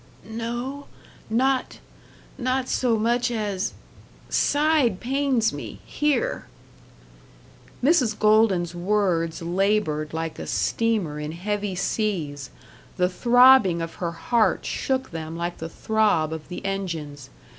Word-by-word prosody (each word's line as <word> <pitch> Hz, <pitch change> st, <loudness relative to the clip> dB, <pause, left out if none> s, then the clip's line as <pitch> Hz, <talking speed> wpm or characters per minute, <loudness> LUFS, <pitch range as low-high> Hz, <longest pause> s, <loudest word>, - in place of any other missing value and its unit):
"No 240 Hz, +5 st, -5 dB, 0.4 s
not 260 Hz, +3 st, +1 dB, 0.6 s
not 255 Hz, 0 st, -1 dB
so 240 Hz, -3 st, +1 dB
much 240 Hz, +3 st, +1 dB
as 205 Hz, -5 st, -2 dB, 0.6 s
Side 290 Hz, -9 st, +2 dB
pains 260 Hz, -3 st, +1 dB
me -, -, -7 dB
here." 300 Hz, -, -1 dB, 1.4 s
Mrs. 255 Hz, -8 st, +3 dB
Golden's 210 Hz, -5 st, +3 dB
words 175 Hz, -3 st, 0 dB
labored 175 Hz, -4 st, 0 dB
like 160 Hz, 0 st, -4 dB
a -, -, -6 dB
steamer 210 Hz, -10 st, 0 dB
in 150 Hz, +1 st, -5 dB
heavy 205 Hz, +2 st, -3 dB
seas; 175 Hz, -, -2 dB, 0.5 s
the 180 Hz, -1 st, +2 dB
throbbing 245 Hz, -3 st, +5 dB
of 165 Hz, 0 st, -4 dB
her 170 Hz, -1 st, -2 dB
heart 215 Hz, +4 st, +1 dB
shook 260 Hz, 0 st, -2 dB
them 160 Hz, 0 st, -6 dB
like 175 Hz, +1 st, -4 dB
the 165 Hz, -, -5 dB
throb 205 Hz, -6 st, +1 dB
of 160 Hz, -2 st, -7 dB
the 180 Hz, +2 st, -7 dB
engines. 165 Hz, -8 st, -4 dB
210 Hz, 115 wpm, -24 LUFS, 170-240 Hz, 1.4 s, throbbing